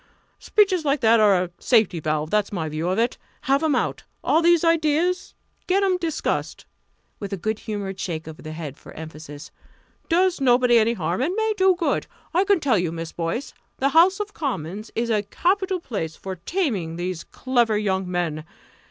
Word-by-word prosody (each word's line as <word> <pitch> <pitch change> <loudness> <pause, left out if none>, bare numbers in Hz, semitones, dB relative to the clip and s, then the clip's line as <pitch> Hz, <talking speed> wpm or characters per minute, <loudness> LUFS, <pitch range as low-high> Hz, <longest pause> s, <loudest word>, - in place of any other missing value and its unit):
Speeches 385 -5 +2
like 280 -1 +1
that 230 0 +5
are 200 -4 +5
a 175 - -7
safety 215 -8 +3
valve 155 0 -2
that's 210 -1 +1
my 170 -6 -2
view 155 +3 -2
of 185 - 0
it. 235 +2 0 0.2
Have 275 +2 +2
'em 310 -4 +2
out - - -1 0.2
all 320 - +3
these 340 0 +4
ideas 330 +2 +1 0.3
get 390 +2 +2
'em 375 -2 +2
discussed!" 330 -3 -2 0.5
with 200 - -6
a 195 - -2
good 215 +4 -2
humoured 200 -3 -5
shake 165 -4 -4
of 160 0 -9
the 155 - -8
head 155 -4 -7
for - - -13
emphasis. 155 -1 -9 0.6
"Does 360 -1 +2
nobody 245 -2 +5
any 225 +1 +2
harm 180 0 -2
and 335 +8 0
may 440 0 +1
do 380 -2 +4
good. 345 -2 -1 0.3
I 365 +4 +3
can 400 -2 +3
tell 255 - +2
you, 175 -2 -1
Miss 165 -1 -5
Boyce, 170 +11 -3 0.2
the 275 - +2
House 350 +6 +5
of 415 0 -4
Commons 215 - -4
is 230 +1 0
a 210 -2 +2
capital 370 - 0
place 195 - -4
for 190 -1 -6
taming 195 - -2
these 175 0 -4
clever 240 -4 0
young 190 -3 -1
men! 170 -4 -2
225 Hz, 185 wpm, -23 LUFS, -, 0.6 s, that